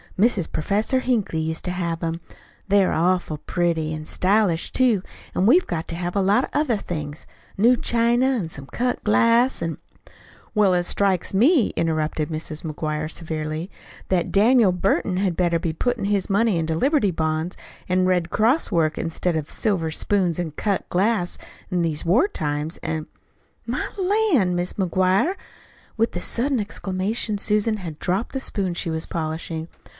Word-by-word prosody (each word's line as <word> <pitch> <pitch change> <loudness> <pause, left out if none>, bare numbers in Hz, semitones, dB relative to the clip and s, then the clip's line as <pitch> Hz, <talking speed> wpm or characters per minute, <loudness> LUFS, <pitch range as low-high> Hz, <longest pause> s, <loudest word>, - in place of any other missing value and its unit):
Mrs. 200 -4 +2
Professor 210 +10 0
Hinkley 220 -11 0
used 160 +1 -3
to 180 - -1
have 170 -2 -3
'em. 165 +1 -2 0.5
They're 200 -1 +3
awful 175 -2 +1
pretty 165 -3 -1
an' 155 0 -6
stylish, 185 -1 +1
too. 245 -7 +3 0.3
And 190 - +2
we've 345 +10 +5
got 165 -2 -3
to 165 - -3
have 175 +2 -4
a 200 - +2
lot 205 +7 +3
of - - -4
other 295 -6 +2
things 155 -5 -6 0.3
new 235 +5 +5
china, 235 +1 +2
an' 235 -11 0
some 140 -4 -6
cut 250 - -2
glass, 230 +4 +3
an' 165 -2 -2 0.4
" - - -25
"Well, 205 -3 +4
it 175 - +1
strikes 195 0 0
me," 250 - +4
interrupted 155 -1 -1
Mrs. 155 -1 -5
McGuire 155 -1 -3
severely, 160 +1 -4 0.4
"that 180 -3 +1
Daniel 220 0 +5
Burton 180 +1 0
had 190 -3 0
better 170 -2 +2
be 165 -2 -2
puttin' 240 +4 -1
his 200 -2 0
money 205 -1 +2
into 160 -1 -1
Liberty 265 - +2
Bonds 160 +1 -2 0.3
an' 185 0 +2
Red 180 -2 +1
Cross 230 - +2
work, 155 -2 +1
instead 165 +1 -1
of 155 -2 -3
silver 185 -7 0
spoons 180 -1 0
an' 170 -3 -2
cut 200 +6 -2
glass, 190 -1 +1 0.3
in 180 -2 0
these 160 -2 -2
war 225 - +4
times. 150 - -3
An' 160 -1 -4 0.3
" - - -40
"My - - -2
lan', 370 - +2
Mis' 175 +1 -2
McGuire!" 190 - +1 0.6
With 225 +1 +1
the 175 - -4
sudden 255 +5 0
exclamation 205 +1 -2
Susan 210 +2 +1
had 170 -6 -7
dropped 190 +8 -1
the 265 - -1
spoon 195 -8 -1
she 170 - -2
was 160 0 -1
polishing. 160 0 -4
185 Hz, 170 wpm, -23 LUFS, 165-215 Hz, 0.6 s, we've